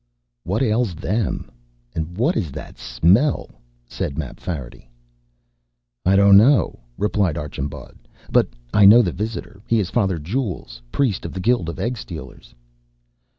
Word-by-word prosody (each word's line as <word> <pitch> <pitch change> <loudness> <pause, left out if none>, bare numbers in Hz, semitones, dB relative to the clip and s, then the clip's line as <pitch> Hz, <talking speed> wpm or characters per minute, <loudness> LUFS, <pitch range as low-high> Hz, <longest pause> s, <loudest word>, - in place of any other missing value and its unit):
"What 100 +8 0
ails 110 -5 +1
them? 105 +5 -2 0.4
What 90 - -1
is 80 - -2
that - - -9
smell?" 110 - +2 0.4
said 70 - -4
Mapfarity. 70 -4 -6 1.2
"I 95 - +5
don't 100 0 +7
know," 120 +2 +4 0.2
replied 100 -6 0
Archambaud, 70 -1 -6 0.3
"but - - +4 0.3
I 105 -1 +7
know 115 +4 +8
the 90 - -1
visitor. 105 0 -5
He 115 - +3
is 95 -4 -2
Father 95 -7 +1
Jules, 85 - -4
priest 120 - 0
of - - -6
the 95 - -5
Guild 100 -4 +1
of 85 - -6
Egg 125 +1 -2
stealers." 70 - -10
100 Hz, 135 wpm, -21 LUFS, 80-115 Hz, 1.2 s, know